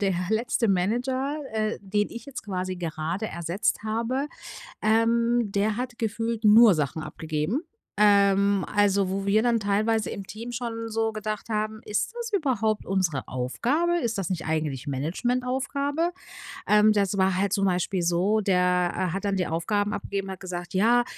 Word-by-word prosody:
Der 195 -2 +1 0.2
letzte 225 0 +1
Manager, 250 +9 0 0.2
äh, 215 0 -1
den 205 +1 -1
ich 235 -1 -8
jetzt 275 -4 -7
quasi 185 -2 -3
gerade 170 +4 -3
ersetzt 170 +3 -1
habe, 235 +6 -1 0.5
ähm, 230 0 +2
der 205 +1 +1
hat 245 -1 -4
gefühlt 225 0 -2
nur 215 0 +8
Sachen 155 +1 -2
abgegeben. 160 - -3 0.4
Ähm, 200 -1 +4
also 200 -2 +2
wo 195 +1 -2
wir 210 +2 +3
dann 235 -1 +2
teilweise 215 +2 +1
im 200 - -6
Team 230 +5 -8
schon 230 -1 -4
so 225 0 0
gedacht 215 0 -5
haben: 215 0 -2
„Ist 210 - -2
das 470 -1 -5
überhaupt 240 - 0
unsere 185 -7 0
Aufgabe? 265 - 0
Ist 230 -9 -2
das 195 - -2
nicht 175 -3 -3
eigentlich 155 -4 -2
Managementaufgabe?“ 255 - -1 0.6
Ähm, 210 0 +5
das 200 -2 +1
war 190 0 +3
halt 200 0 +1
zum 195 -1 +2
Beispiel 180 0 0
so, 175 +5 +2
der, 180 -2 +2
äh, 185 -2 -1
hat 195 +1 -3
dann 200 -1 +1
die 185 -2 0
Aufgaben 205 +6 -1
abgegeben, 195 -1 -4
hat 190 - -7
gesagt: 175 -2 -6
„Ja, 230 +6 +4
210 Hz, 160 wpm, -26 LUFS, 185-230 Hz, 0.6 s, nur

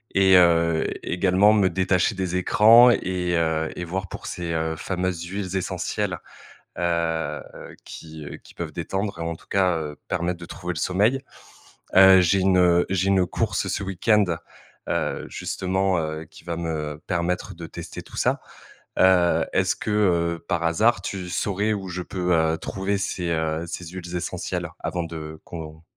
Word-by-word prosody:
et 95 -1 +6
heu, 85 -2 +4 0.2
également 95 +3 +3
me 100 -3 +3
détacher 95 +3 +1
des 95 -1 -2
écrans 110 +6 +7
et 90 -6 0
heu, 80 -1 0
et 90 - -5
voir 95 +2 -3
pour - - -8
ces, 85 -1 -4
heu, 80 0 -1
fameuses 90 +1 -3
huiles 95 +1 -4
essentielles, 95 - -2 0.6
heu, 85 -2 -1 0.4
qui, 80 -1 -10
heu, 70 - -7
qui - - -18
peuvent - - -5
détendre 95 -2 -3
e - - -4
t 85 - -2
en 85 - -3
tout - - -19
cas, 95 -3 +2
heu, 75 -1 -6
permettre 90 0 -2
de 85 - -8
trouver 90 0 -5
le - - -4
sommeil. 105 +9 +2 0.8
Heu, 95 -1 +9
j'ai 90 +2 +3
une, 95 0 +3
heu, 90 -1 +4
j'ai 95 0 0
une 95 -2 +3
course - - -1
ce 100 - -2
week-end, 100 +2 +2 0.6
heu, - - -1
justement, 95 0 -1
heu, 80 0 -3
qui 80 - -17
va 85 -1 -4
me 75 -3 -4
permettre 85 +1 -1
de - - -7
tester - - -8
tout - - -14
ça. - - +1 0.6
Heu, 90 -2 +4
est-ce - - +2
que, - - -4
heu, 85 -5 +1
par 85 - 0
hasard 105 +9 +2
tu 95 -2 -5
saurais 105 +3 0
où 95 -2 -4
je 90 0 -4
peux, 90 0 -2
heu, 80 0 +2
trouver 100 +3 -2
ces, 90 -3 -2
heu, 80 0 -1
ces 90 +1 -6
huiles 90 0 -8
essentielles 90 0 -3 0.2
avant 90 - -1
de 80 -1 -7
qu'on 80 -1 -9
90 Hz, 175 wpm, -24 LUFS, 85-95 Hz, 0.8 s, Heu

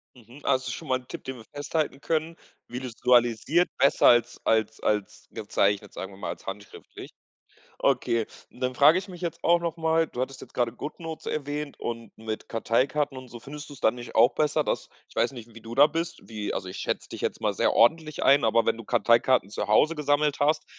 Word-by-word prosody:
Mhm, 125 +4 -16
also 130 -1 +2
das - - -7
ist - - -3
schon - - -8
mal 130 - +2
'n 125 - -20
Tipp, - - -8
den 130 - -5
wir 110 - -13
festhalten 145 0 -3
können, 160 +1 -1 0.3
visualisiert, 125 +5 +2
besser 140 - +4
als 120 0 +4
als 110 -1 +1
als 105 -2 -2
gezeichnet, 100 0 0
sagen 95 - -6
wir 95 - -13
mal - - -5
als - - -7
handschriftlich. 100 +1 -9 0.7
Okay, 115 -1 +1 0.2
und - - -18
dann 130 0 -1
frage 150 +7 +6
ich 195 +2 -7
mich 180 -2 -10
jetzt 170 -3 -4
auch 170 0 +4
noch 170 -1 -3
mal, 160 0 +2
du 125 - -7
hattest 130 0 -4
jetzt - - -12
gerade 120 -2 0
Goodnotes 160 +5 -7
erwähnt 145 0 -4
und 115 -2 -6
mit 110 -1 -6
Karteikarten 135 +5 0
und 130 0 -9
so, 120 - -10
findest 145 +4 -9
du's 140 -4 -11
dann 110 - +3
nicht 120 -1 -9
auch 120 +3 +5
besser, 150 -1 +1
dass - - -2 0.2
ich - - -21
weiß 120 - +2
nicht, 120 -3 -11
wie 115 - -11
du 115 +1 -8
da 145 +2 +7
bist, 165 +2 -4
wie 105 -2 -4
also 95 - -4
ich 90 - -7
schätze - - -3
dich - - -8
jetzt - - -2
mal - - +1
sehr - - +2
ordentlich 155 +5 +3
ein. 140 -1 +5
Aber 115 0 +3
wenn - - +2
du 115 - -9
Karteikarten 120 -1 +3
zu 105 -1 -4
Hause 150 +10 +4
gesammelt 150 -1 +1
hast, 150 +2 +2
130 Hz, 220 wpm, -26 LUFS, 115-150 Hz, 0.7 s, da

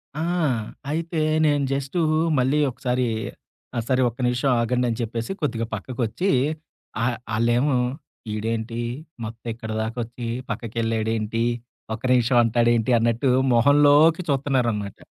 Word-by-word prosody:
ఆ! - - -4 0.7
అయితే 165 +1 -2 0.3
నేను 145 -2 +2
జస్టు 135 +5 -2 0.4
మళ్ళీ 135 +4 +2
ఒకసారి 125 0 -1 0.7
ఆహ్, 115 - -1
సరే 130 -1 +2
ఒక్క 120 +3 -15
నిమిషం 125 +3 +1
ఆగండి 125 +2 +1
అని 115 +1 -3
చెప్పేసి 115 - -3
కొద్దిగా 115 -6 -1
పక్కకొచ్చి. 120 - -2 0.7
ఆహ్, 120 0 0 0.2
ఆళ్ళేమో 120 +5 +2 0.6
ఈడేంటి 115 +2 -3 0.4
మొత్తం 115 +2 -8
ఇక్కడి 110 -1 -6
దాకా 110 +2 -4
వచ్చి 120 +1 -7 0.2
పక్కకెళ్ళాడేంటి, 115 0 -1 0.5
ఒక 110 - -13
నిమిషం 125 0 +3
అంటాాడు 115 +1 +2
ఏంటి 115 +2 0
అన్నట్టు 115 +3 +1 0.2
మొహంలోకి 145 +6 +5
చూతున్నారనమాట. 125 -7 0
120 Hz, 120 wpm, -23 LUFS, 115-135 Hz, 0.7 s, మొహంలోకి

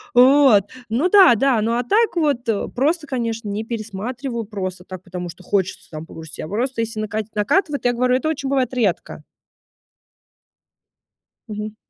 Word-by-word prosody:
Вот. 255 -4 +6 0.3
Ну 270 +12 +1
да, 375 - +7
да. 255 -1 +2
Ну, 230 +2 0
а 245 +1 0
так 435 - +2
вот 280 -7 0 0.3
просто, 300 +5 +1
конечно, 230 -4 -3
не 210 +2 -3
пересматриваю, 230 +2 -5
просто 185 -3 -5
так, 185 -1 -9
потому 180 -1 -6
что 185 +2 -12
хочется 190 -1 -2
там 155 0 -7
погрустить. 160 -2 -11
А - - -6
просто, 240 +3 -2
если 225 -1 -4
накать 215 0 -3
накатывает, 285 - +1
я 245 - +4
говорю, 250 +1 +2
это 265 +5 0
очень 280 -3 -3
бывает 260 -2 0
редко. 215 -8 -2 2.2
Мгм. 210 0 -6
230 Hz, 155 wpm, -21 LUFS, 205-265 Hz, 2.2 s, да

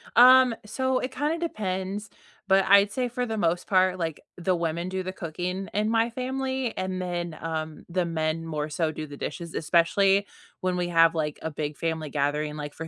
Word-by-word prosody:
Um, 255 -1 +8
so 260 +4 0
it 255 - -3
kinda 295 +5 -1
depends, 205 - -3 0.4
but 195 0 +5
I'd 200 +1 +6
say 250 +3 -1
for 245 +1 -2
the 225 -2 -3
most 175 -3 0
part, 185 -1 +3
like, 165 -3 -3 0.2
the 180 +1 +1
women 170 +1 -2
do 190 0 -3
the 185 - -4
cooking 180 +2 -4
in 210 +1 +1
my 225 +1 +2
family, 260 0 -2
and 185 0 -2
then, 175 -2 -3
um, 160 -1 -4
the 180 +1 0
men 165 0 -1
more 155 -2 -3
so 155 +1 0
do 155 0 -6
the 145 -1 -10
dishes, 170 +2 -5
especially 195 +5 +3 0.4
when 185 -1 0
we 175 -1 0
have, 165 -1 +5
like, 150 -2 -2
a 160 - -3
big 150 0 -4
family 160 -2 -2
gathering, 150 +1 -1
like, 145 -1 -6
for 165 - -7
180 Hz, 195 wpm, -26 LUFS, 160-210 Hz, 0.4 s, Um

